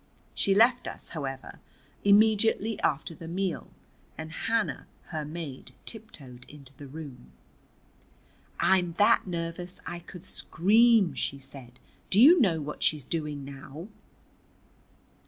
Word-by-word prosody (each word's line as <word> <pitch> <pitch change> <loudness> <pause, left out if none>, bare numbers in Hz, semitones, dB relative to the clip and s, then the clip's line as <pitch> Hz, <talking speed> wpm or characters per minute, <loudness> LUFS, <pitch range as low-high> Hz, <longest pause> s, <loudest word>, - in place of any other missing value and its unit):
She 195 - +2
left 235 +4 +4
us, - - -8
however, 135 -4 -6 0.4
immediately 215 +1 +4
after 155 +2 -1
the 165 0 -10
meal, 185 +1 -3 0.5
and 160 0 -7
Hannah, 225 +6 -1 0.2
her 155 -3 -3
maid, 150 -3 -7
tiptoed 140 - -7
into 140 -2 -14
the 145 - -10
room. 135 - -10 1.3
"I'm 180 -3 +3
that 205 +2 +4
nervous 170 +1 -4
I 175 - -5
could 175 +1 -12
scream," 210 +3 +3
she 140 - -2
said. 130 -2 -10 0.3
"Do 195 - +3
you 310 +7 +8
know 175 -8 +3
what 150 0 -6
she's 150 -4 +1
doing 150 -3 -3
now? 140 +6 -9
165 Hz, 120 wpm, -28 LUFS, 145-200 Hz, 1.3 s, you